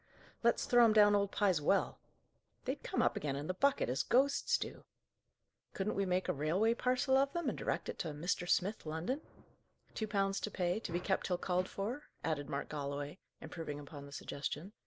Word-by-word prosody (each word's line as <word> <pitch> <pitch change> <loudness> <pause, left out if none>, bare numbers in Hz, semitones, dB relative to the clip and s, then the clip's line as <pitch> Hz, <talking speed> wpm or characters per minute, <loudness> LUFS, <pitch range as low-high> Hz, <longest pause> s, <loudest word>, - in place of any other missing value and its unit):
"Let's 235 0 +3
throw 240 -1 +6
'em 225 -2 +6
down 205 -1 +7
old 200 -1 +2
Pye's 190 -7 +2
well!" - - +2 0.7
"They'd - - -2
come - - 0
up - - +2
again 145 -2 -2
in 140 +2 -4
the 185 - -1
bucket, 280 +8 +2
as 125 +2 0
ghosts 280 - +3
do!" - - -6 0.9
"Couldn't 200 +2 -1
we 195 -1 0
make 180 +1 +1
a - - +1
railway 175 +11 +2
parcel 255 +2 +2
of 275 +1 +2
them, 340 -4 -2
and - - -3
direct - - -2
it - - -5
to 175 - -2
'Mr. 170 +4 -2
Smith, 200 +4 +1
London?'" 170 - -2 0.7
"'Two 220 - -2
pounds 195 -1 +1
to - - -3
pay; 180 0 0
to 220 - -6
be 175 - 0
kept 190 +1 0
till 180 - +1
called 180 +1 0
for,'" 235 +9 -4 0.2
added 145 -3 -2
Mark - - -2
Galloway, 145 +2 -4 0.2
improving 150 -4 -6
upon 140 0 -9
the - - -13
suggestion. 145 +6 -5
190 Hz, 200 wpm, -35 LUFS, 155-220 Hz, 0.9 s, down